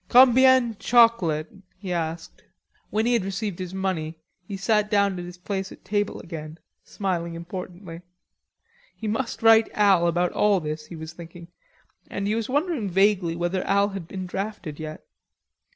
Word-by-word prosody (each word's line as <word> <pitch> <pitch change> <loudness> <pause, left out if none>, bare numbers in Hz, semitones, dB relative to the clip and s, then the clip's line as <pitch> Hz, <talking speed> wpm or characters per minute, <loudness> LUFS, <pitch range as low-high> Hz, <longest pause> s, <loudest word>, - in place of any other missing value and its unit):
"Combien 255 -1 +6
chocolate?" 230 -11 +3 0.3
he 185 -2 -4
asked. 165 -1 -4 0.5
When 215 +1 0
he 245 - +2
had 230 -5 +2
received 195 -1 -4
the 185 0 -5
money, 175 -5 -2 0.3
he 200 - -5
sat 210 +2 +1
down 200 -3 +2
at 175 - -6
his 175 0 -10
place 190 +1 -4
at - - -14
table 205 0 -1
again, 160 -2 -8 0.3
smiling 170 -4 -3
importantly. 175 0 -8 0.9
He 220 - -6
must 225 +1 -3
write 225 0 +6
Al 195 -5 +4
about 175 +1 +1
all 205 -2 +3
this, 155 -1 -5
he 170 - -9
was 160 0 -8
thinking, 170 0 -11 0.6
and 200 - -3
he 210 - +1
was 225 0 -2
wondering 290 - 0
vaguely 190 -2 +2
whether 175 +2 -1
Al 200 +1 +3
had 195 -4 -7
been 185 0 -5
drafted 190 -5 -5
yet. 155 - -7
190 Hz, 160 wpm, -25 LUFS, 170-210 Hz, 0.9 s, Combien